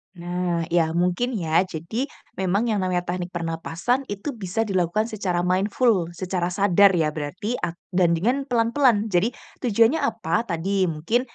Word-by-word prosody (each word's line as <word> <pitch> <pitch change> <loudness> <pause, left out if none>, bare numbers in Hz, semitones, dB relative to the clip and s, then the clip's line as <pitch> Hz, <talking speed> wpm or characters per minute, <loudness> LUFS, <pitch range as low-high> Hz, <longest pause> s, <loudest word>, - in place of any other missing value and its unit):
Nah, 175 -1 -2
iya 165 -1 +2
mungkin 180 +8 0
ya, 165 -2 +2
jadi 180 - -4 0.3
memang 190 +3 +1
yang 215 -2 +1
namanya 180 -1 0
teknik 180 0 -3
pernapasan 165 +8 -1
itu 205 +7 -4
bisa 215 -1 -2
dilakukan 190 +1 0
secara 185 -5 -1
mindful, 195 +1 +2
secara 180 0 -2
sadar 200 0 +5
ya, 155 -2 +1
berarti 170 +10 -4
ak 170 - -3 0.2
dan 175 -2 +3
dengan 245 +11 +1
pelan-pelan. 230 -2 +2
Jadi 180 +6 +3 0.3
tujuannya 230 +4 +3
apa? - - 0
Tadi 185 +3 0
mungkin, 165 +10 0
185 Hz, 150 wpm, -24 LUFS, 175-220 Hz, 0.3 s, sadar